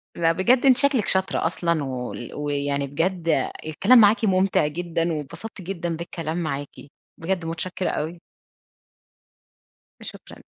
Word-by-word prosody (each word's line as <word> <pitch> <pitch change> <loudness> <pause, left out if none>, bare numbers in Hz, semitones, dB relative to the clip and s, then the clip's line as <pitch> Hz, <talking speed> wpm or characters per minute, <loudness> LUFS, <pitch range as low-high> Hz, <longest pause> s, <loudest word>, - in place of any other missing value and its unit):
لأ، 165 -1 +2
بجد، 240 +10 +2
أنتِ 260 -2 +6
شكلك 275 -5 +2
شاطرة 190 -3 +2
أصلًا، 170 -2 0
وال 125 -2 -5
ويعني 140 -1 -1
بجد 165 -1 0 0.2
الكلام 195 +11 +5
معاكِ 215 +2 +5
مُمتع 190 -5 +2
جدًا، 165 +1 -2
واتبسطت 160 +8 -7
جدًا 175 -2 -4
بالكلام 165 -1 -5
معاكِ، 145 -4 -3 0.5
بجد 175 0 -2
مُتشكِّرة 175 +3 -3
أوي. 165 +3 -3 1.8
شكرًا. - - -10
170 Hz, 120 wpm, -23 LUFS, 150-190 Hz, 1.8 s, أنتِ